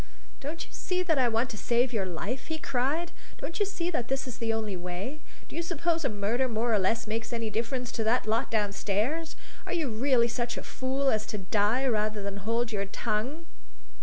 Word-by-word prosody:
"Don't 305 +4 -4
you - - -19
see 365 0 0
that 320 -5 +2
I 250 - +5
want 230 +2 +1
to 215 - -6
save 245 +1 +2
your 200 -4 +1
life?" 200 +9 -3
he 320 - -1
cried. 295 +5 0 0.3
"Don't 335 - -4
you 410 - +3
see 360 -3 -1
that 245 -8 -1
this 270 0 -1
is 250 - -6
the 230 -1 +1
only 220 -3 -1
way? 180 +11 -4 0.3
Do - - -10
you 335 - +1
suppose 335 -1 0
a 270 - +2
murder 220 +5 +1
more 230 +1 +1
or 210 - +5
less 225 +5 +2
makes 220 +2 -2
any 230 -2 -1
difference 235 +3 -1
to 225 - -1
that 235 +3 +3
lot 225 +4 +1
downstairs? 220 +9 0 0.3
Are - - -1
you 325 -6 +1
really 235 +1 +3
such 240 0 -2
a - - -4
fool 265 +1 0
as 215 -1 0
to 210 - -2
die 210 +6 +2
rather 215 -4 +1
than 200 0 -3
hold 230 +4 0
your 200 -2 0
tongue?" 245 +11 -2
235 Hz, 215 wpm, -29 LUFS, 215-275 Hz, 0.3 s, I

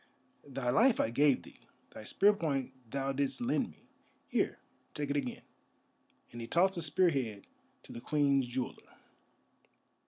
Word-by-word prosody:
Thy 135 -3 -2
life 230 - +4
I 110 - +1
gave 140 +2 +3
thee, - - -15 0.3
thy 110 - -10
spear 205 - +4
point 140 -8 -2 0.2
thou 135 +2 -1
didst 140 0 -1
lend 245 +2 0
me. - - -19 0.5
Here, - - 0 0.4
take 145 -1 -2
it - - 0
again," 130 -4 -3 0.9
and 120 - -7
he 115 - -6
tossed 185 +6 +3
the 175 - -4
spear 170 +4 +3
head 115 -8 -3 0.4
to - - -11
the 115 - -7
Queen's 140 -2 +2
Jeweller. 125 +1 -5
140 Hz, 155 wpm, -32 LUFS, 125-165 Hz, 0.9 s, life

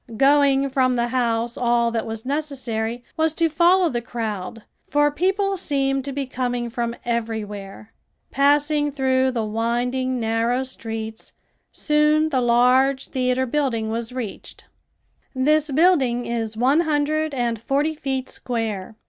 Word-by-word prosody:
Going 275 0 +4
from 255 -1 +2
the 240 0 0
house 235 -2 0
all 235 -1 +2
that 230 -1 -2
was 225 +1 -5
necessary 250 -5 -3
was 320 0 +1
to 330 - +3
follow 345 +3 +4
the 240 -6 -2
crowd, 220 -3 -5 0.3
for 295 +1 +3
people 390 +5 0
seemed 270 -5 -1
to 280 - -3
be 275 0 -3
coming 245 -2 -3
from 235 0 -2
everywhere. 220 -3 -4 0.4
Passing 290 +1 +2
through 260 -1 +1
the 240 -3 -2
winding, 245 +4 -1
narrow 230 +3 0
streets, 225 -3 -7 0.4
soon 300 +1 +2
the 260 -4 +1
large 250 +3 +3
theater 255 0 0
building 235 -5 -1
was 230 +1 -4
reached. 245 -5 -7 0.7
This 300 +3 +3
building 275 -6 +3
is 225 -2 -3
one 265 +6 +3
hundred 310 -1 0
and 235 -3 -1
forty 285 +6 0
feet 265 -4 -3
square. 220 -4 -4
255 Hz, 135 wpm, -22 LUFS, 235-290 Hz, 0.7 s, Going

